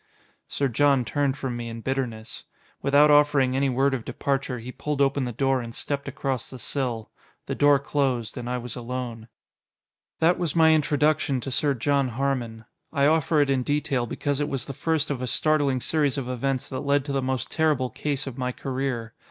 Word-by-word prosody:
Sir 140 - 0
John 135 0 +3
turned 140 +2 0
from 130 -4 -3
me 120 -1 -5
in 115 0 -7
bitterness. 115 -4 -3 0.4
Without 145 +2 +5
offering 145 -3 +4
any 135 0 +2
word 135 +2 +2
of 125 -4 -2
departure, 135 -1 -2
he 120 +2 -7
pulled 150 +2 -3
open 140 -1 +2
the 120 - -3
door 135 +2 +1
and 115 -1 -8
stepped 140 -1 -3
across 135 -3 -3
the 130 - -9
sill. 120 -4 -3 0.3
The - - -3
door 145 -1 +5
closed, 135 -5 -1
and 120 0 -5
I 125 - -1
was 125 -1 -6
alone. 120 -2 -5 0.9
That 170 +2 +3
was 170 -4 -1
my 160 -1 +6
introduction 150 -2 +2
to 135 - -5
Sir 140 +2 +1
John 140 +2 +1
Harmon. 120 -3 -2 0.3
I 140 0 +2
offer 155 0 +3
it 140 -1 +2
in 135 -1 +2
detail 135 -3 0
because 145 +4 -2
it 145 0 -1
was 135 -4 -3
the 140 - -6
first 150 +1 0
of 130 -3 -3
a 125 - -2
startling 145 -1 +2
series 145 -1 +1
of 130 -3 -3
events 130 +1 -2
that 130 - -4
led 140 0 +1
to 145 - -3
the 135 -1 0
most 130 -1 -2
terrible 150 -6 +1
case 145 -2 -2
of 135 -1 -7
my 125 0 -1
career. 130 -3 -3
135 Hz, 200 wpm, -25 LUFS, 125-145 Hz, 0.9 s, my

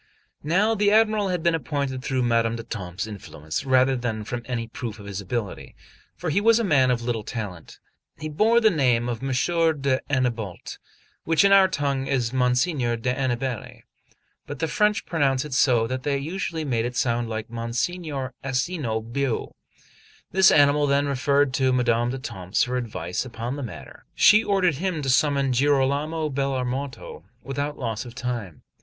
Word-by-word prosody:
Now 195 +9 +2
the 205 -1 +2
Admiral 215 -1 +3
had 180 -3 -2
been 170 -1 +3
appointed 140 -3 -2
through 130 -1 -1
Madame 115 -1 +1
d'Etampes' 95 -5 -5
influence 80 - -6
rather 130 0 +3
than 115 -3 -3
from 120 +3 -4
any 115 -2 -3
proof 115 -1 -6
of 100 - -11
his 100 -1 -5
ability, 105 0 -5 0.4
for 170 -3 -3
he 200 - +2
was 225 +1 +5
a 235 - +1
man 140 - +3
of 120 -2 0
little 115 -2 -2
talent. 100 -8 -7 0.4
He 155 - -5
bore 215 +10 +3
the 220 -2 +4
name 125 -7 +2
of 120 -1 -3
M. 135 - -3
d'Annebault, 130 - -1 0.4
which 165 +4 +3
in 200 - +5
our 195 -1 +7
tongue 140 -6 -1
is 125 -3 0
Monsignor 125 0 +1
d'Aniballe; 125 0 -3 0.6
but 145 - -6
the 160 - -1
French 210 +5 +1
pronounce 140 -5 +1
it 150 - -6
so 125 -4 +3
that 130 +2 -3
they 140 +1 0
usually 160 +2 -3
made 120 -4 0
it 125 0 -4
sound 120 -1 0
like 110 0 -5
Monsignore 130 +4 -3
Asino 130 -3 -1
Bue. 120 +2 -2 0.8
This 190 0 +6
animal 145 0 +4
then 140 +1 +2
referred 140 0 +1
to 130 -1 +2
Madame 120 -1 +2
d'Etampes 105 -7 -2
for 125 +1 -2
advice 90 -8 -3
upon 120 0 -5
the 145 - -5
matter, 120 -6 -9
and - - -23
she 215 +1 +7
ordered 185 -8 +1
him 170 -2 -2
to 135 - +1
summon 140 0 +2
Girolamo 145 +4 +1
Bellarmato 135 0 -3 0.2
without 145 +2 -3
loss 115 -4 -3
of 120 -1 -11
time. 120 - -5
130 Hz, 165 wpm, -24 LUFS, 120-150 Hz, 0.8 s, our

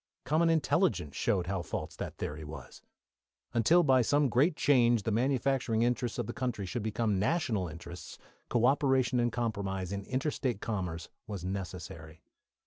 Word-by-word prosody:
Common 160 +5 +3
intelligence 150 - +1
showed 90 -3 +1
how 95 -1 -2
false - - -5
this - - -5
theory 75 +1 -5
was. 75 +2 -10 0.7
Until 160 +10 +4
by 130 -4 +5
some 145 +3 +2
great 145 +8 +3
change 120 -7 +3
the 115 - -1
manufacturing 125 -1 +1
interests 120 -1 0
of 120 - -1
the 120 - -5
country 120 -6 -3
should 120 +6 -3
become 110 -2 0
national 110 - 0
interests, 85 +1 -9 0.3
co 120 -1 +2
operation 130 -2 +3
and 120 0 +2
compromise 100 -6 -2
in 100 0 -3
inter 135 +4 -1
state 125 -8 -2
commerce 90 -7 -4 0.2
was 100 -4 -5
necessary. 85 -4 -6
115 Hz, 155 wpm, -31 LUFS, 95-130 Hz, 0.7 s, by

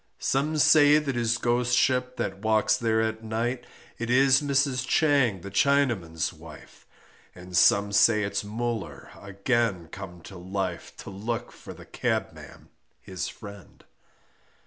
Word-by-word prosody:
Some 150 +4 -1
say 150 +1 +6
that 145 -3 -2
his 120 -1 0
Ghostship 125 +1 +1
that 95 -5 -4
walks 110 0 +2
there 110 -1 0
at 110 0 -3
night, 120 +3 -3 0.3
It 120 0 -4
is 135 +2 +4
Mrs. 140 -2 0
Chang 140 - +2
the 100 - -9
Chinaman's 115 - 0
wife, - - -15 0.5
And 90 0 -10
some 100 +3 +4
say 105 +1 +4
it's 100 0 -2
Muller 115 -1 -5
again 100 -3 -1
come 90 -2 -10
to 95 - -12
life, 95 +1 -5
To - - -9
look 115 +5 -5
for - - -12
the - - -13
cabman - - -4 0.3
his 95 -5 -6
friend. 100 -2 -12
115 Hz, 135 wpm, -26 LUFS, 100-125 Hz, 0.5 s, say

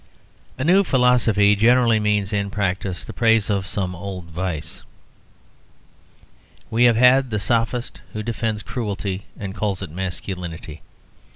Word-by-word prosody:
A 130 - -2
new 185 +6 +5
philosophy 120 - +3
generally 115 +1 +4
means 105 -1 0
in 100 -1 -1
practice 95 -2 -2
the - - -8
praise 115 -3 +2
of 95 -2 -1
some 95 -3 -2
old 90 0 -7
vice. 80 -3 -4 1.9
We 115 +2 +4
have 120 -2 +5
had 125 +2 +5
the 105 - -1
sophist 115 +4 -1
who 110 - -4
defends 110 -2 -2
cruelty, 100 -5 -4
and 100 -2 -6
calls 100 -2 -2
it 90 - -7
masculinity. 90 -3 -6
105 Hz, 130 wpm, -22 LUFS, 95-115 Hz, 1.9 s, new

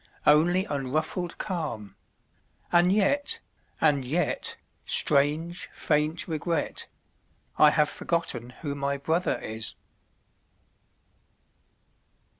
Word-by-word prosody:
Only 175 +6 +5
unruffled 155 +4 -2
calm; 150 - -4 0.8
and 175 +1 +5
yet 215 +9 +2 0.2
— - - -39
and 145 -4 +3
yet 155 +8 -1 0.2
— - - -43
Strange, 155 +5 +1
faint 150 +2 0
regret 165 -1 -2 0.4
— - - -42 0.3
I 150 - +8
have 150 0 +3
forgotten 150 -7 -2
who 145 -2 -2
my 140 0 -1
brother 160 +6 0
is! 110 0 -3
155 Hz, 95 wpm, -27 LUFS, 140-175 Hz, 0.8 s, I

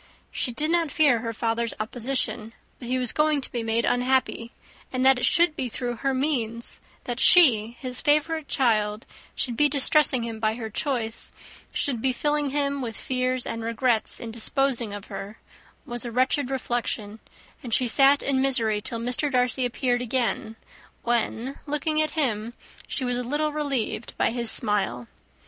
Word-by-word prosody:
She 250 - 0
did 305 +7 -1
not 335 -2 +1
fear 285 -5 +3
her 230 0 -4
father's 230 +1 -2
opposition, 230 0 -2 0.3
but 245 - -9
he 255 +1 0
was 250 -2 +1
going 300 -1 +2
to - - -8
be 240 - -3
made 225 +1 0
unhappy, 245 -2 0 0.4
and 255 0 -1
that 265 -1 +6
it 250 - +2
should 340 -2 +3
be 255 -4 -3
through 240 0 -4
her 270 +3 -1
means; 250 -4 -2 0.2
that 245 0 -4
she, 235 -11 +6
his 255 -2 -4
favourite 305 +1 +1
child, 215 -4 0 0.3
should 245 -3 -2
be 295 +4 +3
distressing 280 -2 +4
him 225 -1 -5
by 220 0 0
her 225 -2 -6
choice, 230 -3 -2 0.4
should 250 -6 -1
be 260 +1 +1
filling 295 +1 0
him 280 0 -1
with 230 -3 -5
fears 255 -1 -1
and 230 - -4
regrets 230 0 0
in 230 - -7
disposing 235 0 0
of 205 -1 -7
her, 205 +3 -8 0.5
was 240 -3 0
a 240 - -5
wretched 255 +2 +1
reflection, 240 -5 -3 0.4
and 240 - -8
she 250 +3 +2
sat 275 +4 +5
in 265 -1 +1
misery 230 -6 +1
till 230 - 0
Mr. 250 +5 0
Darcy 250 0 +1
appeared 245 0 -1
again, 235 -3 -1 0.5
when, 240 +2 -1
looking 305 +1 0
at 310 +1 -2
him, 235 -5 -1 0.3
she 260 - -3
was 245 0 -1
a 250 - -2
little 295 +5 -1
relieved 275 -6 -3
by - - +1
his 235 -1 -1
smile. 200 - +1
250 Hz, 170 wpm, -25 LUFS, 230-275 Hz, 0.5 s, that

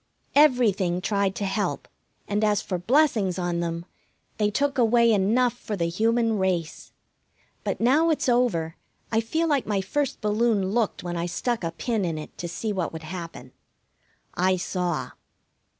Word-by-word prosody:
Everything 225 -11 +3
tried 200 0 0
to 200 - -2
help, 195 +2 -2 0.4
and 205 +1 0
as 210 -2 +3
for 185 -2 -3
blessings 220 - +2
on 175 -1 -1
them, 170 0 -3 0.5
they 210 -1 +3
took 280 +5 0
away 235 0 +4
enough 225 +5 +2
for 220 -3 -5
the 170 -3 -1
human 225 +3 +1
race. 180 -4 -2 0.7
But - - -2
now 285 +8 +4
it's 310 - 0
over 235 -11 +1 0.3
I 225 0 +2
feel 320 +9 -1
like 285 -5 +1
my 205 -2 +1
first 275 +9 -2
balloon 210 -2 +1
looked 225 -1 0
when 175 -1 -4
I 170 +1 -1
stuck 235 +4 -2
a 165 - 0
pin 220 +5 -2
in 165 -3 -2
it 155 - -8
to 175 - -3
see 210 +5 -3
what 185 -4 -2
would 160 0 -8
happen. 165 -6 -8 0.8
I 185 +1 +2
saw. 180 -2 -2
205 Hz, 165 wpm, -25 LUFS, 175-235 Hz, 0.8 s, away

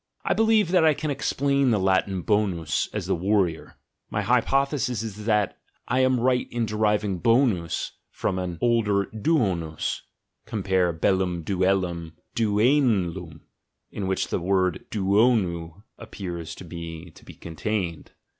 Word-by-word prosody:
I - - +2
believe 220 -4 +3
that 180 -3 +4
I 155 -2 +5
can 155 -2 -3
explain 140 -1 +1
the 110 - +3
Latin 95 -1 +1
bonus 100 -7 0
as - - -4
the - - 0
"war 95 +3 +2
rior": 80 -2 -8 0.3
my - - -1
hypothesis 135 -4 +1
is 105 -1 -7
that 105 -3 +1 0.3
I 125 - +1
am 130 -1 +3
right 125 +1 +1
in 120 -1 -1
deriving 105 -3 0
bonus 115 -7 +1 0.2
from 95 - -2
an 90 -2 -4
older 105 -4 +2
duonus 100 - 0 0.5
(compare 95 -4 +1
beUum 90 +1 0
duellum 90 -3 0
= - - -45
duen 110 - +2
lum, 80 -4 -9 0.5
in 100 - -4
which 95 - -1
the - - -1
word 90 -1 0
duonus 100 -4 +1 0.2
appears 85 -4 -6
to - - -10
me 85 0 -8
to - - -18
be - - -12
contained). 85 0 -4
100 Hz, 145 wpm, -25 LUFS, 90-115 Hz, 0.5 s, I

